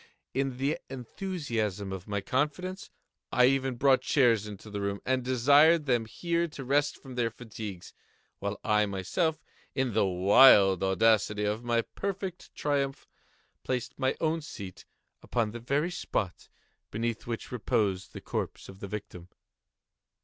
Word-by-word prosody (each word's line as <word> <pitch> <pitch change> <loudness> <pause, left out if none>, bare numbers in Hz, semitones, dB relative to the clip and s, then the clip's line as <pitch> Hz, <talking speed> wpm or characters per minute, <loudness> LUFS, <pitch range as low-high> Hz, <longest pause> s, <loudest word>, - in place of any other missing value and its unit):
In 135 -1 -1
the 140 +4 0
enthusiasm 120 - -3
of 95 +1 -7
my 100 -1 -2
confidence, 150 - -2 0.4
I 130 +2 +5
brought 130 0 +2
chairs 115 -7 +3
into 105 +1 -9
the 100 -1 -3
room, 100 0 -2
and 130 -1 +1
desired 145 +6 +5
them 120 -4 +1
here 170 +8 -1
to 145 -4 -8
rest 145 +3 +1
from 135 -2 -11
their 120 -2 0
fatigues, 110 -5 -8 0.5
while - - -3
I 105 0 +3
myself, 105 - -1 0.3
in 130 -4 0
the 105 -2 +3
wild 95 0 +6
audacity 105 +2 +3
of 105 +3 -1
my 120 -1 +1
perfect 190 - -5
triumph, 140 -2 -1 0.6
placed 125 0 -3
my 130 -1 +1
own 160 +1 0
seat 100 - -9 0.4
upon 115 -3 -1
the 120 - -7
very 140 +8 0
spot 95 - -3 0.4
beneath 115 +2 -3
which 115 -1 -5
reposed 105 -6 0
the - - -8
corpse - - -4
of 95 0 -12
the 100 - -6
victim. 95 -4 -7
120 Hz, 140 wpm, -29 LUFS, 105-140 Hz, 0.6 s, wild